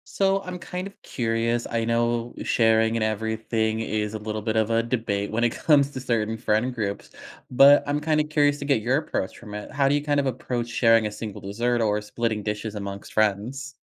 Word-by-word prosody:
So 195 0 +2
I'm 180 -1 -6
kind 180 +2 -5
of 200 - -20
curious. 115 0 -1
I 115 -1 0
know 120 +1 0
sharing 115 0 +3
and 110 - +1
everything 110 +1 -1
is 105 -1 -2
a - - -2
little 110 0 -4
bit 110 +1 -1
of 110 0 +2
a 115 0 +2
debate 110 -4 -2
when 115 +2 0
it 120 - +3
comes 145 -2 +3
to 130 - -5
certain 115 -3 -1
friend 115 +2 0
groups, 100 -4 -4 0.4
but 140 +3 +6
I'm 145 +1 0
kinda 155 0 +1
curious 145 -1 +2
to 140 - -6
get 140 -6 +1
your 125 +4 +2
approach 130 -9 -3
from 105 -2 -10
it. 105 - -7
How 140 -1 +2
do 140 - +2
you 145 - +1
kind 145 -1 0
of 140 - +1
approach 125 -1 -3
sharing 115 -2 +4
a 105 - -4
single 105 -1 -7
dessert 120 +5 -1
or 105 -2 +1
splitting 110 0 -2
dishes 105 +1 -4
amongst 100 -1 -6
friends? 115 +7 -1
115 Hz, 210 wpm, -25 LUFS, 110-135 Hz, 0.4 s, but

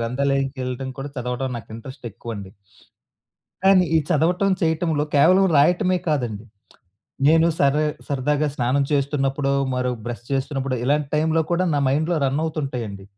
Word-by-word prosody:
గ్రంథాలయంకెళ్ళడం 130 +1 -2
కూడా 140 +2 -4
చదవడం 125 +1 -3
నాకు 115 - -14
ఇంట్రెస్టెక్కువండి 115 -5 -8 1.1
కానీ 190 -1 +6
ఈ - - +6
చదవటం, 180 +6 +2
చేయటంలో 160 -2 +1
కేవలం 185 +7 +5
రాయటమే 180 +5 +3
కాదండి. 120 -7 -2 0.8
నేను 160 +2 +5
సరే 140 +2 +3 0.2
సరదాగా 145 +2 0
స్నానం 130 +3 +1
చేస్తున్నప్పుడో, 140 -1 0 0.2
మరి 125 0 0 0.2
బ్రష్ 120 -1 -6
చేస్తున్నప్పుడో 135 -1 -1
ఇలాంటి 145 +1 +1
టైంలో 160 +1 +2
కూడా 175 +2 +2
నా - - +2
మైండ్‌లో 155 +5 +1
రన్నవుతుంటయండి. 135 -9 -3
140 Hz, 120 wpm, -22 LUFS, 125-160 Hz, 1.1 s, కానీ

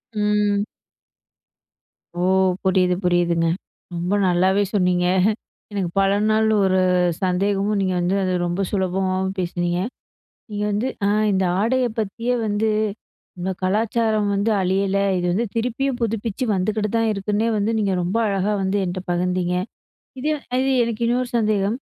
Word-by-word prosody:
ம். 210 -1 +1 1.5
ஓ! - - -8 0.5
புரியுது 185 -1 +3
புரியுதுங்க. 175 -1 +2 0.5
ரொம்ப 175 +3 -1
நல்லாவே 190 +3 +3
சொன்னீங்க 180 -2 +2 0.7
எனக்கு 190 -4 -2
பல 195 0 +3 0.2
நாள் 220 0 +3 0.2
ஒரு 190 0 +3 0.4
சந்தேகமும் 200 +3 +1
நீங்க 185 -1 0
வந்து 175 +2 0
அது 185 -1 0
ரொம்ப 175 +3 -2
சுலபமாவும் 190 0 -1
பேசுனிங்க. 175 -1 -1 0.7
நீங்க 205 0 -2
வந்து 215 +6 0 0.2
ஆ! - - +3 0.2
இந்த 190 0 +1 0.2
ஆடைய 250 +3 +2
பத்தியே 230 +4 -1
வந்து 210 +1 0 0.7
இந்த 180 +2 -2
கலாச்சாரம் 215 +2 +1
வந்து 200 +3 +1
அழியல. 195 +1 +1 0.2
இது 175 - -1
வந்து 225 +6 0
திருப்பியும் 250 +3 -1
புதுப்பிச்சு 225 +1 -2
வந்துக்கிட்டு 210 +3 -1
தான் 225 -1 +2
இருக்குன்னே 210 +2 -1
வந்து 210 +2 0
நீங்க 200 -3 +1
ரொம்ப 180 +5 -1
அழகா 200 0 0
வந்து 190 +1 0
என்ட்ட 180 +1 -3
பகிர்ந்தீங்க. 180 0 0 0.7
இது 295 - -1 0.2
அ - - +2
இது 270 0 +1
எனக்கு 230 -1 -3
இன்னொரு 245 +1 0
சந்தேகம். 210 -1 +1
200 Hz, 135 wpm, -22 LUFS, 185-215 Hz, 1.5 s, புரியுது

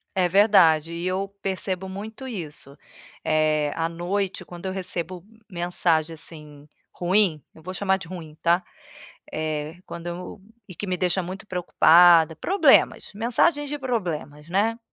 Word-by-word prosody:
É 185 -1 +3
verdade. 175 -5 +4
E 170 +2 -3
eu 195 +2 -1
percebo 190 -1 -3
muito 215 +7 -7
isso. 150 - -7 0.5
Eh, 155 -1 +1
à 165 0 0
noite, 185 +3 -3
quando 175 +1 -11
eu 190 - -2
recebo 180 -2 -4 0.3
mensagem, 170 -2 0
assim, 150 -2 -10 0.3
ruim 180 -3 +2
eu 160 - -15
vou 185 +2 -6
chamar 190 0 +1
de 185 - -10
ruim, 160 -4 -8
tá? 170 +2 +3 0.7
Eh, 155 +1 -3
quando 170 0 -8
eu 180 +3 -6 0.3
e 185 - -10
que 205 - -6
me 185 -1 -1
deixa 180 +1 0
muito 190 +4 -7
preocupada 170 -2 +5
problemas. 380 - +3
Mensagens 275 +7 +1
de 295 - -4
problemas, 170 - -4
né. 215 +5 +1
180 Hz, 145 wpm, -24 LUFS, 160-195 Hz, 0.7 s, preocupada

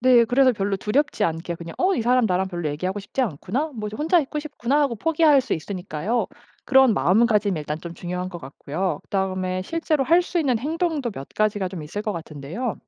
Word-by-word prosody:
네. 245 -1 +6
그래서 255 +2 +4
별로 200 -2 -1
두렵지 265 +10 0
않게 165 +1 -2
그냥 165 0 -8
'어 380 +2 +3
이 235 - -1
사람 250 +1 +3
나랑 190 -1 0
별로 175 -4 -3
얘기하고 185 +7 -3
싶지 200 +7 -4
않구나. 245 - -2
뭐 210 -2 -4
저 210 - -7
혼자 325 +4 +3
있고 300 +1 -4
싶구나' 290 -2 -1
하고 280 -5 +1
포기할 305 +2 +4
수 265 - -4
있으니까요. 185 +5 -2 0.4
그런 265 -4 +5
마음가짐이 205 - +3
일단 150 +1 -4
좀 170 0 -8
중요한 180 +1 -4
것 175 - -7
같고요. 150 +6 -4
그다음에 185 -1 -1
실제로 310 - 0
할 340 +5 +5
수 350 0 -2
있는 265 -8 +2
행동도 310 -1 -1
몇 140 -9 -8
가지가 210 -3 +1
좀 180 -3 -7
있을 170 +8 -5
것 215 - -2
같은데요. 165 - -5
210 Hz, 435 characters per minute, -23 LUFS, 180-270 Hz, 0.4 s, 네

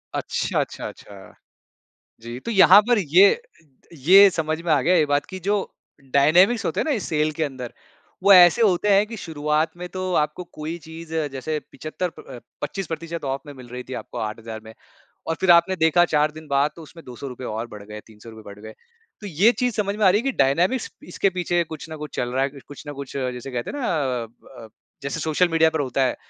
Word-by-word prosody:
अच्छा, - - -2
अच्छा, - - -4
अच्छा। 100 -2 -13 0.9
जी, 120 +2 -8
तो - - -6
यहाँ 195 -1 +7
पर 240 -3 +4
ये, 190 - +4 0.6
ये 195 +8 +7
समझ 160 -1 -2
में 170 - -3
आ 145 - +3
गया 180 +6 +3
ये 155 -2 +3
बात 145 0 +1
कि 190 - -8
जो 205 - +2 0.6
डायनामिक्स 175 +11 +4
होते - - -1
हैं - - 0
ना, 315 - -2
इस 210 - -4
सेल 155 -1 +1
के 160 - +1
अंदर, 130 -4 -6 0.5
वो 200 0 +6
ऐसे 180 +4 +7
होते 205 0 +2
हैं 205 +2 +4
कि 225 0 -8
शुरुआत 155 -2 -1
में 180 0 -7
तो 185 0 -4
आपको 150 +3 -1
कोई 155 +2 -6
चीज़ 160 0 -10 0.2
जैसे 150 +3 -3
75 165 +3 -4
प 125 -3 -11 0.2
पच्चीस 185 +5 -4
प्रतिशत 165 0 -6
ऑफ 135 0 -2
में 145 - -9
मिल 125 -2 -13
रही 125 +1 -7
थी 130 - -6
आपको - - -10
8000 110 +1 -6
में 110 - -11 0.5
और 165 - -1
फिर 190 - +3
आपने 175 +2 +5
देखा 160 +1 +4
4 150 -2 +1
दिन 155 0 -12
बाद 140 +2 +2
तो 165 - -10
उसमें 165 +2 -14
₹200 125 0 -8
और 110 +2 -4
बढ़ 105 -2 -10
गए, 105 0 -9
₹300 110 0 -14
बढ़ 105 - -17
गए। 110 - -9 0.5
तो 205 - -8
ये 195 +6 +3
चीज़ 245 -3 0
समझ 200 -1 -1
में 215 - 0
आ - - +7
रही 205 +4 +2
है - - -10
कि 270 - 0
डायनामिक्स 175 - +1 0.2
इसके 195 - 0
पीछे 175 -1 0
कुछ 160 -1 -9
न 160 - -6
कुछ 150 0 -9
चल 120 0 -2
रहा 130 - 0
है, 140 - -2 0.2
कुछ 145 - -11
न - - -4
कुछ 140 -1 -8
जैसे 125 0 -4
कहते 120 -2 -4
हैं - - -6
ना 245 - -2 0.4
अ - - -10 0.4
अ, - - -12 0.3
जैसे 140 +4 -4
सोशल 160 +3 +1
मीडिया 160 -1 +3
पर 160 - -2
होता 130 0 0
है 125 - -1
155 Hz, 225 wpm, -23 LUFS, 135-180 Hz, 0.9 s, यहाँ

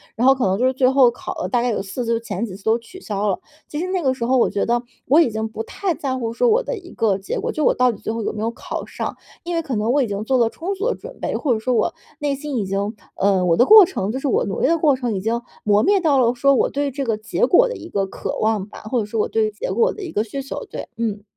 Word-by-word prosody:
然 245 +3 +2
后 270 - +8
可 260 - 0
能 190 +1 +1
就 250 - +1
是 260 - +3
最 255 0 +3
后 265 -3 +5
考 240 - -6
了 - - -3
大 245 -2 +2
概 245 - 0
有 210 - -1
4 200 +6 -4
次， 230 - +1
就 230 - 0
前 225 -1 -3
几 185 - -8
次 195 - -14
都 220 +1 +3
取 305 +11 -13
消 205 0 -2
了。 190 - -1 0.3
其 295 - -5
实 365 - -2
那 370 -1 -1
个 260 - +2
时 240 -3 -3
候 260 +2 +3
我 - - +3
觉 200 - -1
得 240 +1 +1 0.3
我 290 +5 +6
已 290 - +3
经 220 +1 -2
不 220 0 -5
太 365 - -2
在 265 -3 -3
乎 230 -2 -3
说 475 - +2
我 455 +3 +4
的 - - -3
一 360 -3 -12
个 205 -4 +1
结 195 - -4
果， - - -2
就 310 - -2
我 - - +5
到 250 0 +3
底 220 - -9
最 - - -3
后 230 - -3
有 - - -2
没 215 - -5
有 230 +1 0
考 - - -6
上， - - -5 0.3
因 345 0 -3
为 330 - +1
可 275 -6 -4
能 215 +3 +1
我 280 +2 +3
已 - - -2
经 205 +1 -3
做 260 +2 +2
了 235 -2 +3
充 355 +10 -4
足 410 +5 -2
的 - - -1
准 - - -11
备， - - -2
或 270 -6 +1
者 220 - -1
说 250 +3 0
我 220 - +1 0.3
内 290 -2 0
心 280 -2 -4
已 205 - -1
经 200 +3 -2 0.2
呃， 195 -2 +2
我 170 - +3
的 245 - +6
过 430 -2 +9
程 210 - -3
就 260 - -3
是 280 - -2
我 255 - +2
努 195 - -3
力 - - +3
的 335 - +3
过 300 -4 +3
程 240 -5 -2
已 190 - -2
经 230 +3 -1 0.2
磨 210 0 +4
灭 400 0 +4
到 300 -5 +3
了 240 -1 +3
说， 275 +3 +4
我 - - +2
对 285 0 -1
这 275 +1 -3
个 225 -3 0
结 215 +2 0
果 - - +5
的 - - -4
一 - - -9
个 195 -1 0
渴 195 - -5
望 215 -2 0
吧， - - -11
或 240 +3 -1
者 215 - -1
说 215 +2 -3
我 - - +2
对 220 -1 +1
结 210 - -4
果 470 +1 +2
的 425 - -9
一 350 - -6
个 210 - 0
需 275 +5 -5
求， 275 - -6
对， - - -7
嗯。 215 -3 -2
240 Hz, 350 characters per minute, -21 LUFS, 215-285 Hz, 0.3 s, 过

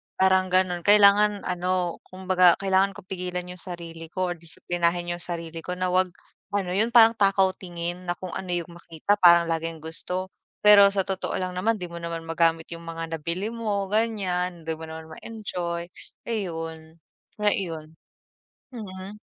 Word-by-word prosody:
parang 190 0 +3
gano'n, 180 -2 +1
kailangan 205 0 +6
ano, 180 -1 -1
kumbaga 185 -1 +3
kailangan 195 0 +2
ko - - -11
pigilan 180 -1 -4
yung 180 0 -8
sarili 165 -2 -8
ko 185 -1 -1
or - - -14
disiplinahin 175 +1 -2
yung 175 - -8
sarili 165 -2 -4
ko 180 - -5
na 185 0 -1
'wag, 185 0 +3 0.5
ano 185 -3 -1
yun, 225 +5 +1
parang 230 -1 +7
takaw 195 -1 +4
tingin 175 0 -6
na 175 - +1
kung 185 -2 -7
ano 185 - -5
yung 175 -1 -3
makita, 170 +4 -1
parang 170 -2 +6
laging 165 -1 -3
gusto. 180 +3 -2 0.3
Pero 200 -1 +9
sa 195 -1 -1
totoo 190 -1 -3
lang 185 -1 -3
naman 215 +5 0
'di 180 - -5
mo 170 - -9
naman 165 -1 -5
magamit 165 0 +1
yung 165 - -9
mga 165 0 -5
nabili 170 +7 -3
mo, 210 -4 -1
ganiyan, 190 -5 -1
hindi 160 - -1
mo 160 - -8
naman 160 0 -9
ma-enjoy, 175 -6 -5 0.4
ayun, 165 -7 -5 0.4
nga 210 - +4
iyon. 160 -4 -5 0.8
Mm. 200 -3 -8
180 Hz, 165 wpm, -25 LUFS, 170-195 Hz, 0.8 s, Pero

